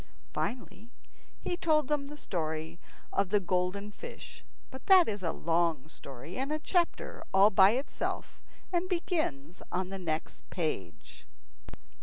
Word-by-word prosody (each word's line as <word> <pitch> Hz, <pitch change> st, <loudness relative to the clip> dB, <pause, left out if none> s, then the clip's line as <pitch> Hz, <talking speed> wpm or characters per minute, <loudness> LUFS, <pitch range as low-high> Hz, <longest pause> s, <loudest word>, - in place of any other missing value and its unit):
Finally, 235 Hz, -2 st, -4 dB, 0.5 s
he 355 Hz, -, -1 dB
told 305 Hz, -4 st, +2 dB
them 290 Hz, -1 st, 0 dB
the 295 Hz, +1 st, -8 dB
story 160 Hz, -, -3 dB, 0.3 s
of 195 Hz, -2 st, +2 dB
the 210 Hz, +1 st, +4 dB
Golden 185 Hz, +2 st, -1 dB
Fish. -, -, -10 dB, 0.3 s
But 260 Hz, -1 st, -10 dB
that 375 Hz, -3 st, +8 dB
is 205 Hz, -2 st, -2 dB
a 165 Hz, -3 st, 0 dB
long 165 Hz, -4 st, +1 dB
story, 140 Hz, +2 st, -9 dB
and 270 Hz, +2 st, -1 dB
a 305 Hz, -, +1 dB
chapter 345 Hz, +2 st, 0 dB
all 200 Hz, +2 st, +7 dB
by 190 Hz, +1 st, +7 dB
itself, 265 Hz, +4 st, -3 dB, 0.3 s
and 355 Hz, +1 st, +1 dB
begins 250 Hz, -, -1 dB
on 185 Hz, +1 st, -1 dB
the 195 Hz, 0 st, -5 dB
next 160 Hz, -3 st, -4 dB
page. 100 Hz, -, -4 dB
195 Hz, 140 wpm, -31 LUFS, -, 0.5 s, that